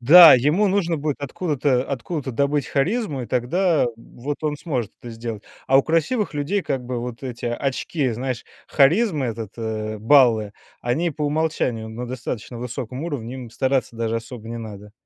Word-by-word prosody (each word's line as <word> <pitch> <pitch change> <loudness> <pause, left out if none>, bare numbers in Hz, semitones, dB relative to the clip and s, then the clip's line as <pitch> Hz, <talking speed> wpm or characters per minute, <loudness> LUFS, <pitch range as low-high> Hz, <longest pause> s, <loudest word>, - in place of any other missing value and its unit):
Да, 160 +5 +10
ему 150 - +3
нужно 180 -4 +1
будет 150 -1 -2
откуда-то 140 -3 0
откуда-то 140 +2 -3
добыть 140 +2 +1
харизму, 150 - 0
и 120 - -6
тогда 155 +6 +2
вот 130 +5 -6
он 150 -1 0
сможет 125 - -3
это 120 - -8
сделать. 115 -2 -6 0.2
А 135 +1 +6
у - - +5
красивых 165 - 0
людей, 165 +7 0
как 130 -4 -2
бы, 125 -1 -3
вот 120 0 -6
эти 125 -2 -5
очки, 135 +3 -1
знаешь, 125 +1 -3 0.2
харизмы, 155 - +3
этот 115 -3 -5
э, 110 -1 -3
баллы, 115 -4 +4 0.3
они 155 +8 0
по 150 - -6
умолчанию 145 -7 0
на 120 +3 -6
достаточно 120 -1 -5
высоком 125 +3 -5
уровне, 130 -7 -4
им 125 -3 -8
стараться 130 -1 0
даже 115 0 -1
особо 115 0 -7
не 115 - -5
надо. 105 -2 -9
130 Hz, 165 wpm, -23 LUFS, 115-150 Hz, 0.3 s, Да